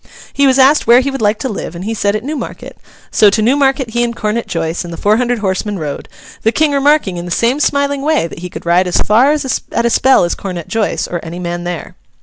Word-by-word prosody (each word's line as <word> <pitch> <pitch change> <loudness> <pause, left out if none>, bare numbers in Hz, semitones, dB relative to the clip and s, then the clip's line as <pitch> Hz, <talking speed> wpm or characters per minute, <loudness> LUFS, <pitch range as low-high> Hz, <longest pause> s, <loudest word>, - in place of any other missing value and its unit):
He 280 0 +3
was 260 0 +3
asked 275 +1 +4
where 240 +2 +7
he 275 +1 -2
would 270 - -5
like 210 0 +2
to 265 - -3
live, 200 -6 -5
and 175 +3 -7
he 225 - -2
said 205 -1 0
at 215 - -3
Newmarket. 295 +2 -6 0.4
So, 210 - +5
to 205 - 0
Newmarket 265 +1 +1
he 240 +1 0
and 235 -1 -2
Cornet 215 +2 -2
Joice 165 0 -2
and 175 - -8
the 165 - -7
four 210 +1 +2
hundred 245 0 0
horsemen 205 0 -2
rode; 150 -4 -6 0.3
the 225 - +2
King 300 +5 +1
remarking, 280 -9 +2
in 175 - -5
the - - -7
same 235 +10 +1
smiling 280 -1 0
way, 305 - +1
that 165 - -8
he 180 +1 -7
could - - -9
ride 175 +2 +3
as 180 - 0
far 240 +7 +3
at 265 -5 -2
a - - +3
spell 265 -2 +4
as 175 - 0
Cornet 180 -4 -6
Joice, 225 -2 -1
or 175 - -4
any 165 +1 -8
man 175 -1 -4
there. 175 -2 -5
225 Hz, 250 wpm, -15 LUFS, 180-270 Hz, 0.4 s, where